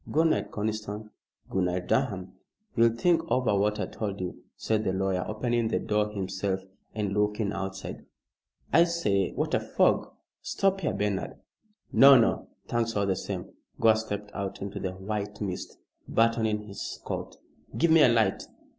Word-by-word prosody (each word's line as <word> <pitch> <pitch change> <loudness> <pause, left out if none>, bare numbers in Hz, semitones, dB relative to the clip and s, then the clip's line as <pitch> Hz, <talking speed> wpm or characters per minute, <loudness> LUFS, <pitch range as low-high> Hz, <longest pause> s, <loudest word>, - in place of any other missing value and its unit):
"Good 160 +2 +4
night, - - 0
Conniston. 105 0 -4 0.4
Good 95 -1 0
night, 90 0 -2
Durham." 100 -9 0 0.4
"You'll 115 -1 +4
think 165 +6 +3
over 125 -5 +2
what 105 +1 +1
I - - 0
told 100 -2 -4
you," 90 -1 -6
said 110 -1 0
the 95 - 0
lawyer, 95 -1 0
opening 120 +1 0
the 110 - 0
door 105 0 0
himself 95 -1 -2 0.3
and 105 -2 -1
looking 105 0 0
outside. 95 0 -5 0.7
"I 170 - +7
say, 105 - 0
what - - -2
a - - +4
fog! - - +2 0.3
Stop 195 0 0
here, 150 - 0
Bernard." 100 -2 -1 0.6
"No! 135 -1 +9
No! 115 - +1 0.2
Thanks 115 -1 -1
all 100 -1 +2
the 95 -1 +1
same." 95 -1 -5 0.3
Gore 110 -1 +6
stepped 105 -2 -4
out 100 -1 -4
into 100 0 -5
the 95 -1 -3
white 105 +2 -4
mist, 95 -3 -5 0.3
buttoning 110 -2 +2
his 100 -2 -6
coat. - - -5 0.4
"Give 170 +1 +3
me 160 -1 +7
a 125 - +7
light. 110 -4 +2
105 Hz, 165 wpm, -28 LUFS, 95-115 Hz, 0.7 s, No